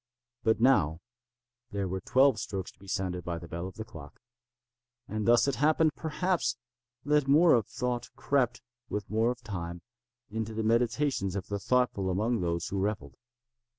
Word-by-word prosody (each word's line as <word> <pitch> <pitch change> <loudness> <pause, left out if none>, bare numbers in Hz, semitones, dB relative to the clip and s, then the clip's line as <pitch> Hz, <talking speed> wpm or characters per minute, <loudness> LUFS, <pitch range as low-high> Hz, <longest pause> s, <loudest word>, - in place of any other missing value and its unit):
But 110 -1 +2
now 95 - +4 0.7
there 100 -4 -2
were 95 +1 -3
twelve 130 +1 +4
strokes 95 -2 -4
to - - -32
be 100 - -15
sounded 90 -2 -2
by 85 -1 -3
the 85 0 -9
bell 85 +2 -4
of 95 - -10
the 110 - -5
clock; 75 -8 -12 0.9
and 110 +1 -3
thus 120 +3 +5
it 140 - 0
happened, 155 +2 +3
perhaps, 160 -5 -1 0.5
that 150 -1 +3
more 155 +5 +6
of 115 -5 +2
thought 125 -1 -3
crept, 125 -4 0 0.3
with 105 -1 -4
more 110 +2 +2
of 125 0 -4
time, 85 -5 -5 0.5
into 110 0 -3
the 110 - -1
meditations 115 -2 +1
of 100 - -4
the 100 0 -2
thoughtful 120 -5 +1
among 110 +5 0
those 85 -1 -1
who 100 - -2
revelled. 100 +1 -2
110 Hz, 170 wpm, -29 LUFS, 95-125 Hz, 0.9 s, more